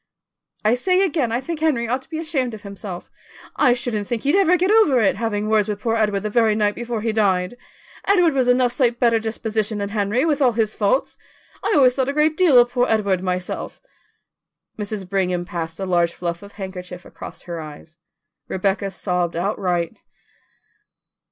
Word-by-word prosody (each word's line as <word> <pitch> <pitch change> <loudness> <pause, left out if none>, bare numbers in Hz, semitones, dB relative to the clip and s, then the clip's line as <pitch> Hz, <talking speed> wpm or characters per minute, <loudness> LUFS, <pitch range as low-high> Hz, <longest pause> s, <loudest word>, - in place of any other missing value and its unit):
"I 215 - +4
say 365 +9 +2
again 305 -11 0
I 235 - 0
think 315 +4 -5
Henry 285 -7 +1
ought 255 +3 -1
to - - -21
be 320 - -4
ashamed 270 -7 -2
of 210 - -13
himself. 200 -2 -8 0.4
I 245 - +4
shouldn't 240 -5 -3
think 235 -2 -3
he'd 285 +2 +2
ever 360 -2 +4
get 370 +3 +1
over 425 - +5
it, 215 - +2
having 215 -2 -2
words 215 -1 +2
with 205 -1 -3
poor 225 0 0
Edward 210 -3 +1
the 215 - -3
very 225 -2 +3
night 210 -1 +1
before 235 -1 -4
he 225 +1 0
died. 190 -1 +1 0.5
Edward 360 -5 +4
was 260 -2 +1
enough 250 0 +3
sight 240 -2 +1
better 230 -2 +3
disposition 220 -1 -2
than 200 -1 -3
Henry, 210 +6 0
with 300 -3 +1
all 250 -3 +4
his 220 -1 0
faults. 210 +6 0 0.4
I - - +1
always 260 -4 +5
thought 265 0 0
a - - -1
great 300 +1 +2
deal 325 -7 +5
of 240 0 +5
poor 245 0 +1
Edward, 200 -4 +1
myself." 180 -1 -4 1.0
Mrs. 210 -2 -5
Brigham 180 -2 -1
passed 165 -1 -5
a 195 - -2
large 175 -2 +1
fluff 170 -1 -4
of 200 0 -13
handkerchief 180 -2 -8
across - - -10
her 170 -2 -6
eyes; 155 +1 -11 0.5
Rebecca 195 +1 -1
sobbed 180 -3 -2
outright. 175 -2 -1
220 Hz, 190 wpm, -21 LUFS, 195-255 Hz, 1.0 s, over